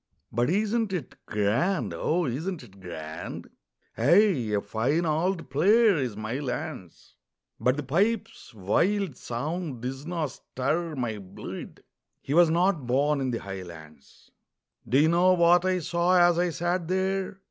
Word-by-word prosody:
"But 120 +4 +1
isn't 215 +3 +1
it 165 -9 -4
grand? 110 - 0
O, 160 - 0
isn't 155 +6 -3
it 100 -4 -16
grand?" 80 -4 -7 0.4
"Ay, 155 - +4
a 105 - +2
fine 120 +12 0
auld 165 +3 -1
player 210 +8 +5
is 125 -7 -2
Mylands, 115 - -5 0.5
But 125 +2 +2
the 150 - -3
pipes' 195 - -1
wild 155 - 0
sound 140 +2 -4
disna 150 +6 -3
stir 150 +5 -3
my 115 -5 -3
bluid" 95 -2 -9 0.4
He 140 - -4
was 170 0 +6
not 170 -5 +1
born 140 +3 +2
in 130 - -1
the 120 - -1
highlands. 85 -7 -11 0.6
Do 125 - +3
you 150 +3 +5
know 175 +3 +4
what 175 0 +4
I 185 0 +2
saw 175 +2 +1
as 175 -1 +5
I 175 0 +2
sat 175 +1 -2
there? 190 +1 -1
150 Hz, 140 wpm, -27 LUFS, 120-180 Hz, 0.6 s, was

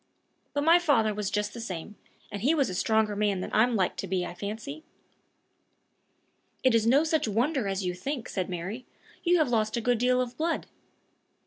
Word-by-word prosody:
But 285 - 0
my 335 +3 +6
father 235 -11 +2
was 205 -1 -2
just 210 0 -1
the 235 - -7
same, 190 -1 -6 0.4
and 200 -1 -5
he 285 +8 +3
was 275 -10 +1
a - - -4
stronger 215 +2 +1
man 205 -2 +1
than - - -5
I'm 235 +3 +3
like 190 -4 +1
to 195 - -4
be, 180 -1 -1
I - - -6
fancy." 220 - -6 1.8
"It 255 - +4
is 225 -1 +3
no 275 +6 +5
such 315 -5 +1
wonder 240 +3 0
as 195 0 -2
you 180 - -1
think," 245 +7 -4
said 185 -2 -3
Mary; 185 +8 -5 0.4
"you 355 0 +4
have 310 -5 +2
lost 220 -1 +1
a - - +1
good 245 0 +1
deal 250 +1 +3
of 250 -1 -2
blood." 330 +1 -1
220 Hz, 200 wpm, -28 LUFS, 200-270 Hz, 1.8 s, my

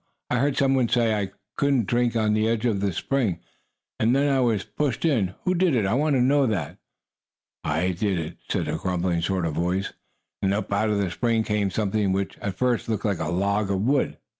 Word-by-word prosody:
"I 125 - +2
heard 140 +1 +1
some 135 -1 +3
one 130 -3 +2
say 115 -2 +2
I 100 -3 -1 0.3
couldn't 140 -5 +2
drink 120 +2 +1
on 110 -2 +2
his 110 +1 +2
edge 115 0 0
of 110 -5 +1
the 100 0 0
spring, 110 -3 -1 0.6
and 115 +3 +3
then 140 0 +2
I 135 - +2
was 115 -6 +1
pushed 130 +7 -2
in. 105 - +1
Who 185 - +1
did 180 -5 +2
it? 110 -5 +2
I 95 - +1
want 145 +3 +2
to 130 - +3
know 135 +2 +3
that!" 95 -10 -3 0.8
"I 80 +5 0
did 95 +1 -1
it!" 80 0 -5
said - - -1
a - - -1
grumbling 90 -2 -1
sort 90 0 0
of 80 - -2
voice, 90 +5 -1 0.5
and 95 0 +1
up 105 -1 -3
out 110 +2 +1
of 105 - +1
the 100 -3 0
spring 115 +1 +1
came 105 -2 0
something 105 0 0
which, 95 0 -2
at 100 -2 -4
first, 125 -1 0
looked 110 -2 -2
like 100 -4 0
a 80 - -2
log 100 +4 0
of 95 -1 0
wood. 135 +5 +1
105 Hz, 225 wpm, -25 LUFS, 95-125 Hz, 0.8 s, some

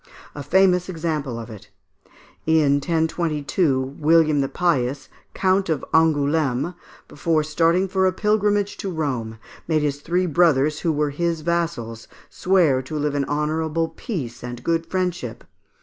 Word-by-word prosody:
A 145 - -7
famous 180 +4 +3
example 155 -8 -3
is 115 - -6
given 110 -1 -10
of 100 - -13
it. 105 - -20 0.8
In 155 -3 +4
1022, 150 -3 -1
William 155 -1 +4
the 135 - -1
Pious, 140 -4 -1 0.3
Count 190 -1 +1
of 155 -4 -1
Angoulême, 155 -1 +2 0.3
before 155 +1 0
starting 165 +4 +2
for 190 0 +1
a - - +2
pilgrimage 205 0 +1
to 195 - -4
Rome, 130 -10 -3 0.3
made 155 -2 +1
his 145 -1 -2
three 180 +4 0
brothers, 155 -3 +2
who 170 - 0
were 150 -1 0
his 170 +2 -1
vassals, 160 -9 -2 0.2
swear 170 -8 +2
to 140 +4 -6
live 150 -1 -1
in 140 -1 0
honourable 155 +2 -1
peace 130 - -6
and 120 0 -7
good 165 0 0
friendship. 175 -11 -3
155 Hz, 150 wpm, -22 LUFS, 140-175 Hz, 0.8 s, In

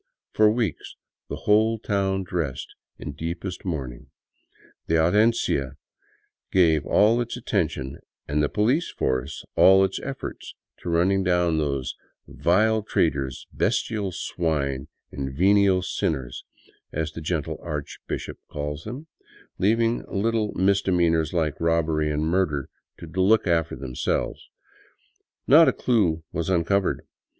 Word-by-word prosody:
For 110 0 +5
weeks 115 0 -2 0.3
the - - -3
whole 110 +2 +4
town 95 -3 -1
dressed 80 -7 -3 0.3
in - - -6
deep 85 +5 -5
est 90 -2 -5
mourning; 65 -9 -5 0.8
the 80 - +2
andiencia 85 - +2 0.8
gave 80 -5 +3
all 115 +4 +4
its 120 +1 -4
attention 75 - -2 0.3
and 75 +1 0
the 75 - +1
police 125 +11 +1
force 65 +4 -2
all 95 +1 +7
its 95 - -3
efforts 140 0 -7 0.2
to - - -6
running 95 +4 +2
down 90 -3 +2
those 70 -4 -2 0.2
" - - -51
vile 110 +5 +2
traitors, 70 -10 -1
bestial 105 -4 0
swine, 75 -6 -2 0.2
and 65 -1 -5
venal 95 0 +4
sinners," 70 -8 -3 0.5
as 80 0 -2
the 80 - -8
gentle 80 -1 -3
archbishop 75 -4 -6
calls 75 +1 -5
them, 125 +8 -7 0.5
leaving 115 +4 +2
little 110 +1 0
mis 100 +1 +3
demeanors 85 -4 +2
like 80 -4 -1
robbery 80 -2 +1
and 75 0 -1
murder 80 -4 0 0.3
to - - -9
look 95 +7 +2
after 85 -2 +1
themselves. 65 -2 -3 1.0
Not 160 +5 +7
a - - +5
clue 90 -10 +1
was 85 +1 -3
uncovered. 95 +2 +1
85 Hz, 125 wpm, -24 LUFS, 75-100 Hz, 1.0 s, all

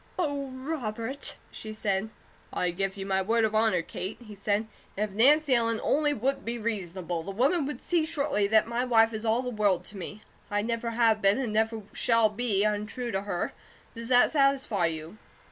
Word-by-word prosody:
"Oh, 285 -6 -1
Robert!" 260 -2 -3 0.2
she 215 - -6
said. 215 -1 -1 0.4
"I 180 - 0
give 195 +2 -2
you 195 - -5
my 190 -1 +1
word 225 +3 +2
of 215 - -1
honour, 215 -5 +3
Kate," 190 +5 -6
he 220 -3 -11
said. 205 +2 0 0.3
"If 210 0 -1
Nancy 280 +7 +4
Ellen 230 -2 +2
only 295 0 +2
would 270 +1 -1
be 235 +1 -3
reasonable, 185 -6 -3
the 165 - -8
woman 275 - +1
would 285 -4 -5
see 345 -3 +1
shortly 280 -10 0
that 220 +1 +4
my 235 +2 -1
wife 225 -2 +4
is 215 +1 -4
all 230 +3 +2
the 250 - -3
world 205 -5 +1
to 205 - -10
me. 205 +3 -7 0.3
I 205 0 0
never 230 +1 -2
have 225 -2 +2
been, 195 +1 +4
and 245 -5 -2
never 220 0 0
shall 230 -2 +3
be, 210 -2 0
untrue 215 +4 -2
to 195 -2 -1
her. 200 -3 -3 0.4
Does 230 0 -7
that 245 -1 +5
satisfy 275 - +2
you?" 160 +5 -6
220 Hz, 195 wpm, -28 LUFS, 205-250 Hz, 0.4 s, that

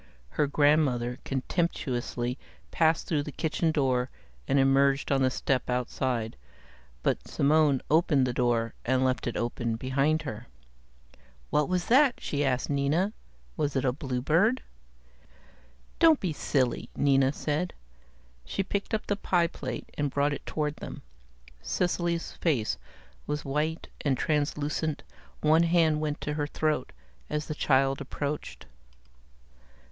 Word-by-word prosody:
Her 145 - +1
grandmother 140 -4 +2
contemptuously 130 -4 -2 0.3
passed 160 -1 +2
through 155 -3 0
the 150 - -6
kitchen 160 +2 0
door 130 -4 +1 0.4
and 140 - +2
emerged 135 +1 +3
on 135 -1 +3
the 130 - +4
step 130 0 -1
outside, 125 - -1 0.7
but - - 0
Simone 145 -2 +3
opened 155 -4 +3
the 125 - -1
door 120 -2 +1
and 130 +1 +2
left 130 -1 0
it 120 - -2
open 120 -1 -1
behind 135 +6 +1
her. 115 -4 -6 1.0
"What 150 -1 +2
was 180 -1 0
that?" 265 +1 +5
she 145 0 -1
asked 130 -2 0
Nina. 150 +8 +1 0.4
"Was 150 -3 -1
it 135 - +1
a 125 - +3
bluebird?" 150 - +1 1.4
"Don't 325 -3 +6
be 180 -5 -2
silly," 130 -4 0
Nina 135 -1 +4
said. 150 +4 -2 0.7
She 195 - -2
picked 200 +3 -2
up 215 - -4
the 205 - 0
pie 175 -3 +2
plate 130 -7 -6
and 145 -1 +1
brought 145 +2 +1
it - - -7
toward 150 -1 -2
them. - - -8 0.6
Cecily's 175 - -1
face 135 -11 0 0.5
was 150 0 -3
white 150 +4 -1 0.2
and 135 -3 +1
translucent, 150 0 -1 0.4
one 155 +2 +5
hand 165 -3 +3
went 150 -1 -2
to 150 - -2
her 145 -1 -1
throat 150 -3 -1 0.4
as 150 0 -2
the 155 - -4
child 135 -2 +2
approached. 145 +2 -4
145 Hz, 135 wpm, -28 LUFS, 130-160 Hz, 1.4 s, Don't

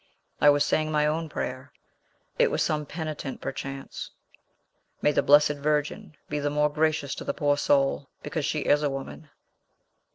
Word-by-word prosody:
"I 145 - +6
was 145 0 +4
saying 155 +1 0
my 150 -1 +2
own 160 +1 -1
prayer. 130 0 -5 0.7
It - - +5
was - - 0
some 150 -1 -1
penitent, 155 -4 -5
perchance. 135 -1 -6 0.9
May 150 - +3
the - - +2
Blessed 145 0 +5
Virgin 150 0 -2
be 150 - -2
the 145 0 0
more 150 +1 +2
gracious 155 -2 +1
to - - -6
the - - -3
poor 145 -1 +2
soul, 140 -1 +1
because 160 -4 -3
she 150 +1 -1
is 145 +1 +3
a 145 - +1
woman." 135 +3 -7
150 Hz, 165 wpm, -26 LUFS, 145-155 Hz, 0.9 s, I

